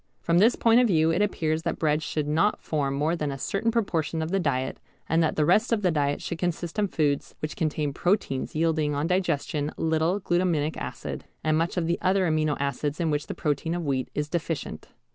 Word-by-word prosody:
From 170 +1 +2
this 225 +5 +5
point 230 +1 +4
of 250 - +4
view 160 -4 +3
it 170 +5 +1
appears 160 -6 0
that - - -2
bread 150 -1 +1
should 150 -1 -2
not 165 +7 +2
form 140 -3 -1
more 155 +4 +1
than 150 -3 -2
a 135 - -5
certain 195 +10 -1
proportion 165 -8 0
of 160 - -4
the 195 - +2
diet, 135 -6 -1 0.3
and 165 +2 +2
that 160 - +1
the 150 - +2
rest 215 +9 +3
of 220 -3 +1
the 180 - +3
diet 145 -2 0
should 170 - -4
consist 175 +1 -2
of 205 -2 +1
foods 145 -3 0
which 155 - -5
contain 150 -2 -1
proteins 175 -7 0
yielding 155 -2 +1
on 145 +2 0
digestion 155 -4 0
little 160 +4 +1
glutaminic 175 -5 0
acid - - -6 0.2
and 155 0 +2
much 165 +3 0
of 175 - +1
the 170 +1 0
other 185 0 +2
amino 155 -2 +1
acids 140 +2 -2
in 165 -2 +1
which 145 0 -1
the - - -5
protein 155 +3 -1
of 175 -2 -3
wheat 130 -3 -1
is 150 0 -1
deficient. 165 -2 -4
160 Hz, 220 wpm, -26 LUFS, 150-175 Hz, 0.3 s, this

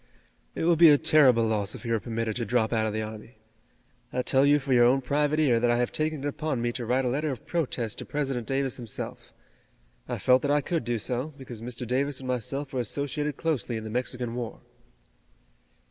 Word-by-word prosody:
"It - - -2
would 170 -1 +3
be 170 -2 +9
a 145 - +7
terrible 135 -7 +5
loss 105 -2 -1
if - - -10
he 115 - -3
were 115 - +2
permitted 115 -1 -3
to 120 - -1
drop 115 0 +1
out 110 -1 +1
of 105 - -3
the 110 0 -2
army. 110 +1 -9 0.7
I 125 - -1
tell 135 +2 +3
you 145 +1 +6
for 135 -2 -1
your 120 -1 +6
own 130 +3 +4
private 145 +4 +1
ear 130 -7 +3
that 120 +1 +2
I 120 - +3
have 120 0 0
taken 155 -2 -1
it - - -1
upon 145 -2 -2
me 120 0 0
to 120 -1 -5
Write 130 +2 +1
a - - +1
letter 145 +5 -1
of 130 -5 -6
protest 130 -9 -2
to - - -6
President 135 -5 -3
Davis 135 -1 -1
himself. 120 -4 -7 0.8
I - - -2
felt 130 0 +4
that 145 - -1
I 145 +1 +4
could 165 -4 -2
do 120 -1 0
so, 125 +7 -3
because 125 -5 -9
Mr. 125 +1 -5
Davis 135 +3 0
and 130 - -6
myself 135 +3 -3
were 130 - -1
associated 145 +4 -3
closely 135 -8 -1
in 110 - -6
the 110 - -6
Mexican 125 0 -2
War." 120 -2 -5
125 Hz, 225 wpm, -27 LUFS, 115-145 Hz, 0.8 s, be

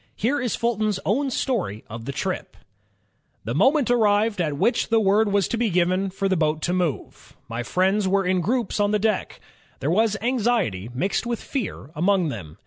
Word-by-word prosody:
Here 265 +7 0
is 245 -3 -1
Fulton's 215 -4 0
own 270 +7 +1
story 220 - -2
of 115 +1 -8
the 140 - -3
trip: - - -4 0.9
"The 115 - -3
moment 265 - +3
arrived 210 -3 +2
at 150 -4 -1
which 235 - +1
the 225 -1 +4
word 205 +1 +3
was 200 -2 +2
to 235 - -1
be 235 -2 +2
given 185 +2 +1
for 195 +1 -2
the 190 - +1
boat 155 -2 0
to 175 - 0
move. 175 -6 -3
My 115 +1 -4
friends 190 - +1
were 195 0 +2
in 185 0 +1
groups 230 +3 -1
on 205 0 +3
the 210 - +2
deck. 215 -1 -1 0.4
There 140 +4 -1
was 215 +3 +2
anxiety 225 - 0
mixed 190 - -1
with 235 -2 -2
fear 235 - -5
among 180 +1 +2
them. 85 - -8
195 Hz, 190 wpm, -23 LUFS, 170-225 Hz, 0.9 s, the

